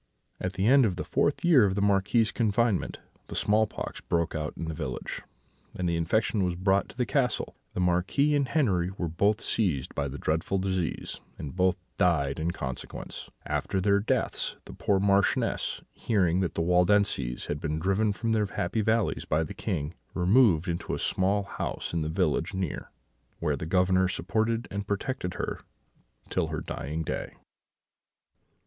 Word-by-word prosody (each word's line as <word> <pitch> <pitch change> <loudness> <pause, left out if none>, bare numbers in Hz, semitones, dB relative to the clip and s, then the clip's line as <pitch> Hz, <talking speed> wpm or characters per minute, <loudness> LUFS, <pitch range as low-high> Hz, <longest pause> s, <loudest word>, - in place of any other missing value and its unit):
"At 95 0 -2
the 95 +1 -1
end 135 +3 +6
of 100 -6 +1
the - - -3
fourth 145 +5 0
year 155 -9 +7
of 95 -2 +2
the - - 0
Marquis's 100 +3 +3
confinement 110 -2 +1 0.3
the - - -7
small 105 +1 +3
pox - - -6
broke 85 -1 0
out 75 -1 -4
in - - -4
the 80 - -3
village, 65 -4 -4 0.5
and 90 - -1
the 85 - +1
infection 100 +5 +1
was 90 -1 0
brought 95 +2 +2
to - - -14
the 125 - +1
castle. 125 +2 0 0.2
The 90 - 0
Marquis 90 +12 +2
and 140 -2 +2
Henri 100 - +1
were 85 - -1
both 100 +7 +1
seized 85 - 0
by 70 -1 -1
the 70 +1 -6
dreadful 80 +6 0
disease, 95 -3 -2 0.2
and 75 - -7
both 90 0 +3 0.2
died 80 -5 +2
in 80 +2 0
consequence. 65 -7 -6 0.2
After 95 - -1
their 100 +1 +3
deaths, 100 - 0
the - - -10
poor 100 -2 +1
Marchioness, 100 0 +1
hearing 90 -6 +1
that 95 -3 -1
the - - 0
Waldenses 90 -7 +2
had 75 - -3
been 75 0 -2
driven 95 +6 +1
from 115 +3 -2
their 110 -2 +2
happy 95 +3 -1
valleys 110 -1 +1
by 80 +1 +1
the 80 - -6
King, 75 +3 -3 0.2
removed 95 -2 +4
into 85 0 -2
a - - -3
small 100 +2 +1
house 100 - -4
in 85 - 0
the 75 - -2
village 85 +1 0
near, 95 -5 -3 0.5
where 75 -3 0
the 80 +3 -5
Governor 95 +1 +3
supported 110 +5 -1
and 100 0 -4
protected 100 -1 -2
her - - -3 0.7
till - - +1
her - - -3
dying 80 +3 -4
day." - - -4
95 Hz, 175 wpm, -28 LUFS, 85-105 Hz, 0.7 s, year